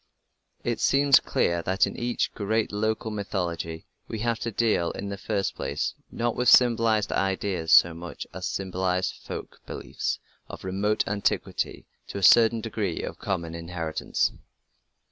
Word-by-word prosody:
It 120 -1 -1
seems 140 0 +5
clear 85 0 0
that 95 +3 +2
in - - -6
each 120 0 -1
great 110 +2 0
local 110 +1 -1
mythology 85 -5 -3 0.2
we 110 - -4
have 115 0 0
to 115 - -2
deal, 110 -6 +1
in 100 - -5
the 100 - -3
first 100 -1 -1
place, - - -2 0.2
not 120 0 -1
with 125 -1 +3
symbolized 115 -4 +5
ideas 95 -3 -1
so 85 0 +7
much 85 +1 -7
as 95 0 -4
symbolized 95 -1 -1
folk - - -7
beliefs - - -3 0.3
of - - -9
remote 100 +3 0
antiquity 100 0 -1
and, - - -31
to - - -4
a 100 - -4
certain 115 +2 +6
degree, 105 -5 -3
of - - -6
common 85 -5 -3
inheritance. 85 -1 -2
100 Hz, 150 wpm, -26 LUFS, 90-110 Hz, 0.3 s, so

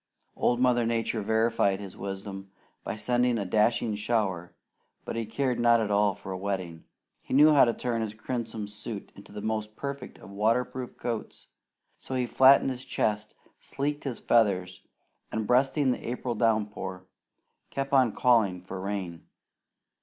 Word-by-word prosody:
Old 120 - +1
Mother 125 -1 +3
Nature 115 -1 -1
verified 110 -2 +1
his 100 -2 -8
wisdom 95 0 -6 0.3
by - - -4
sending 120 +2 +1
a 100 - -2
dashing 110 +3 +2
shower, 105 -5 -1 0.5
but - - -4
he 115 -2 -2
cared 125 +3 -1
not 120 0 +5
at 105 -2 -1
all 100 -1 +3
for 100 -1 -9
a 95 - -3
wetting. 95 -4 -4 0.4
He - - -3
knew 150 +2 +7
how 140 - +7
to 115 - +1
turn 120 -2 -2
his 110 -1 -4
crimson 110 -2 -4
suit 105 0 -7
into 100 - -14
the 105 0 -7
most 110 -1 -3
perfect 140 0 -6
of 95 - -13
water 110 +5 +2
proof 130 -1 -8
coats; 115 -3 -5 0.5
so 130 - -6
he 125 -1 +1
flattened 135 +2 +5
his 125 0 -6
crest, 105 -3 -2 0.2
sleeked 145 +1 -3
his 130 -4 -4
feathers, 95 -6 +2 0.5
and 110 -1 -2
breasting 135 +3 +3
the - - -4
April 125 0 -3
downpour, 105 -5 -1 0.6
kept 135 0 -4
on 130 -4 +5
calling 110 -7 +3
for 95 0 -7
rain. 95 -4 -5
110 Hz, 160 wpm, -28 LUFS, 100-125 Hz, 0.6 s, knew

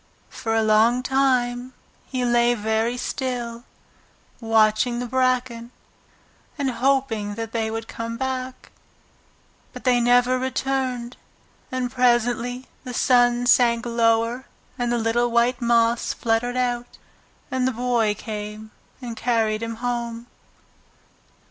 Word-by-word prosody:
For 225 -2 -2
a 225 - +2
long 220 +3 +3
time 255 -2 0 0.3
he 255 -2 -2
lay 240 0 +3
very 220 +2 -1
still, 245 -2 -4 0.7
watching 225 +1 +2
the 245 - -3
bracken, 250 -2 0 0.9
and 275 -3 0
hoping 235 -5 0
that 225 0 -5
they 225 -1 -1
would 225 0 -5
come 230 0 -5
back. 260 0 -4 1.0
But - - -10
they 250 -2 +3
never 245 +1 +3
returned, 260 -2 -2 0.5
and 255 -1 -2
presently 245 0 +1 0.2
the 250 -3 -6
sun 245 -1 +3
sank 235 -1 +4
lower 230 +1 +1 0.3
and 245 -2 -1
the 240 - +1
little 235 +1 +1
white 235 +2 +2
moths 235 0 +2
fluttered 240 +2 0
out, 245 -1 -2 0.5
and 260 -1 +1
the - - +1
Boy 235 -3 0
came 215 0 -7 0.3
and 235 -2 -5
carried 225 -2 0
him 230 0 -4
home. 235 -1 -3
240 Hz, 120 wpm, -23 LUFS, 230-250 Hz, 1.0 s, sank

